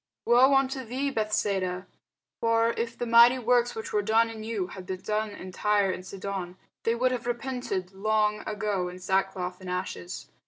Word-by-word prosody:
woe 255 Hz, +3 st, +6 dB
unto 270 Hz, 0 st, +1 dB
thee, 260 Hz, +4 st, -2 dB
Bethsaida! 200 Hz, -5 st, -1 dB, 0.5 s
for 230 Hz, 0 st, +3 dB
if 230 Hz, +1 st, -3 dB
the 240 Hz, -, -2 dB
mighty 235 Hz, +2 st, +7 dB
works, 245 Hz, 0 st, +2 dB
which 220 Hz, -, -6 dB
were 210 Hz, -, +3 dB
done 225 Hz, +2 st, +3 dB
in 220 Hz, -1 st, -8 dB
you, 220 Hz, -4 st, -2 dB
had 185 Hz, +1 st, -9 dB
been 185 Hz, -1 st, -4 dB
done 215 Hz, 0 st, -1 dB
in 190 Hz, -2 st, -9 dB
Tyre 205 Hz, 0 st, +2 dB
and 185 Hz, -, -5 dB
Sidon, 190 Hz, -1 st, -5 dB, 0.2 s
they 230 Hz, -, +1 dB
would 255 Hz, +2 st, +2 dB
have 245 Hz, -2 st, -3 dB
repented 240 Hz, -6 st, -3 dB
long 210 Hz, +1 st, +1 dB
ago 205 Hz, -3 st, -1 dB
in 180 Hz, -, -9 dB
sackcloth 190 Hz, 0 st, -1 dB
and 185 Hz, -, -7 dB
ashes. 180 Hz, -, -5 dB
215 Hz, 180 wpm, -27 LUFS, 190-235 Hz, 0.5 s, mighty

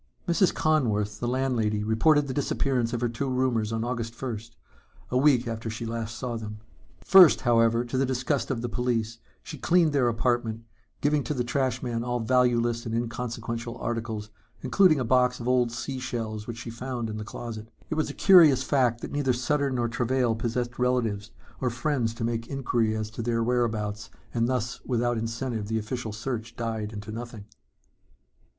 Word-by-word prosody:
Mrs. 175 Hz, +2 st, +3 dB
Conworth, 105 Hz, -9 st, +1 dB
the 120 Hz, -, -2 dB
landlady, 120 Hz, -5 st, 0 dB
reported 140 Hz, +8 st, +3 dB
the 130 Hz, -, -3 dB
disappearance 130 Hz, -4 st, 0 dB
of 120 Hz, -1 st, -2 dB
her 120 Hz, -, +2 dB
two 120 Hz, +4 st, -3 dB
roomers 125 Hz, -4 st, 0 dB
on 115 Hz, 0 st, -1 dB
August 115 Hz, -1 st, -3 dB
first, 115 Hz, -3 st, -6 dB, 0.6 s
a 125 Hz, -, +2 dB
week 130 Hz, -4 st, +4 dB
after 115 Hz, 0 st, -4 dB
she 110 Hz, +1 st, -5 dB
last 115 Hz, 0 st, -4 dB
saw 120 Hz, -1 st, -3 dB
them. 105 Hz, -1 st, -7 dB, 0.5 s
First, 185 Hz, -5 st, +8 dB
however, 115 Hz, -1 st, +3 dB
to 130 Hz, +2 st, -2 dB
the 135 Hz, -, +3 dB
disgust 130 Hz, +2 st, -1 dB
of 120 Hz, -3 st, -2 dB
the -, -, 0 dB
police, 115 Hz, -2 st, -1 dB, 0.2 s
she 155 Hz, -, -8 dB
cleaned 170 Hz, -1 st, +3 dB
their 135 Hz, -4 st, +3 dB
apartment, 115 Hz, -1 st, 0 dB, 0.4 s
giving 145 Hz, 0 st, +2 dB
to 150 Hz, -, -2 dB
the 125 Hz, -, 0 dB
trash 125 Hz, -1 st, -1 dB
man 115 Hz, -2 st, -2 dB
all 125 Hz, 0 st, -1 dB
valueless 120 Hz, -1 st, +2 dB
and 115 Hz, -, -2 dB
inconsequential 115 Hz, 0 st, -4 dB
articles, 115 Hz, -3 st, -4 dB, 0.3 s
including 185 Hz, -7 st, +4 dB
a 125 Hz, -, -1 dB
box 125 Hz, +1 st, +3 dB
of 120 Hz, -, -5 dB
old 125 Hz, -2 st, +3 dB
sea 130 Hz, +3 st, -4 dB
shells 110 Hz, -4 st, -4 dB
which 115 Hz, -1 st, -5 dB
she 115 Hz, 0 st, -6 dB
found 120 Hz, 0 st, -4 dB
in 110 Hz, -1 st, -5 dB
the 105 Hz, -, -4 dB
closet. 110 Hz, 0 st, -7 dB, 0.2 s
It -, -, +2 dB
was 155 Hz, 0 st, 0 dB
a -, -, -7 dB
curious 170 Hz, -9 st, +7 dB
fact 125 Hz, -5 st, +1 dB
that -, -, -6 dB
neither 140 Hz, -3 st, +1 dB
Sutter 140 Hz, +3 st, 0 dB
nor 120 Hz, -3 st, 0 dB
Travail 120 Hz, +1 st, +1 dB
possessed 120 Hz, +2 st, -3 dB
relatives 115 Hz, -5 st, 0 dB, 0.3 s
or 130 Hz, -, 0 dB
friends 120 Hz, -2 st, -1 dB
to 115 Hz, -, -5 dB
make 115 Hz, 0 st, -2 dB
inquiry 120 Hz, -5 st, 0 dB
as 110 Hz, 0 st, -3 dB
to 110 Hz, -, -5 dB
their 115 Hz, 0 st, 0 dB
whereabouts 110 Hz, -3 st, -1 dB, 0.2 s
and 115 Hz, -1 st, +1 dB
thus 125 Hz, -2 st, -2 dB
without 120 Hz, -2 st, 0 dB
incentive 115 Hz, -1 st, -3 dB
the 110 Hz, +1 st, -1 dB
official 110 Hz, +1 st, -4 dB
search 115 Hz, +1 st, -5 dB
died 110 Hz, -2 st, -3 dB
into 105 Hz, 0 st, -7 dB
nothing. 115 Hz, -2 st, -7 dB
120 Hz, 185 wpm, -27 LUFS, 115-130 Hz, 0.6 s, First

